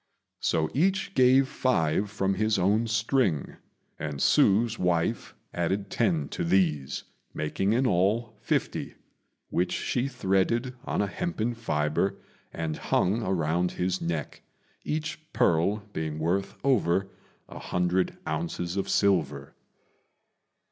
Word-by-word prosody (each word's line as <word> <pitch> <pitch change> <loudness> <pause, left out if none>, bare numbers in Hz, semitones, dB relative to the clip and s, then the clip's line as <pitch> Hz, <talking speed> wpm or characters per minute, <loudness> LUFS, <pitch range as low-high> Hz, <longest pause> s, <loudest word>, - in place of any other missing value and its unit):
So 80 -1 0
each 190 +5 +1
gave 130 -1 +5
five 100 -8 +1
from 100 -1 0
his 110 +2 +1
own 105 +5 +2
string, 110 - 0 0.4
and 75 -2 -3
Hsü's 110 +10 +3
wife 85 -2 0 0.2
added 95 +4 -1
ten 85 -11 +1
to - - -3
these, 80 -6 +1 0.3
making 95 +7 0
in 125 +3 +2
all 110 +3 +1
fifty, - - -2 0.6
which 90 0 +1
she 125 +1 -1
threaded 120 +1 0
on - - 0
a - - +1
hempen 120 - -2
fibre 95 -2 0 0.3
and 80 -2 -3
hung 105 +6 +1
around 90 -2 0
his 90 +1 -1
neck, 85 -3 -3 0.4
each 155 0 -3
pearl 90 +6 +2
being 80 -1 -3
worth 90 +5 -1
over 100 -8 +2 0.4
an - - -10
hundred 90 +1 0
ounces 85 +3 -3
of 100 - -1
silver. 75 -9 +1
95 Hz, 120 wpm, -27 LUFS, 85-115 Hz, 0.6 s, gave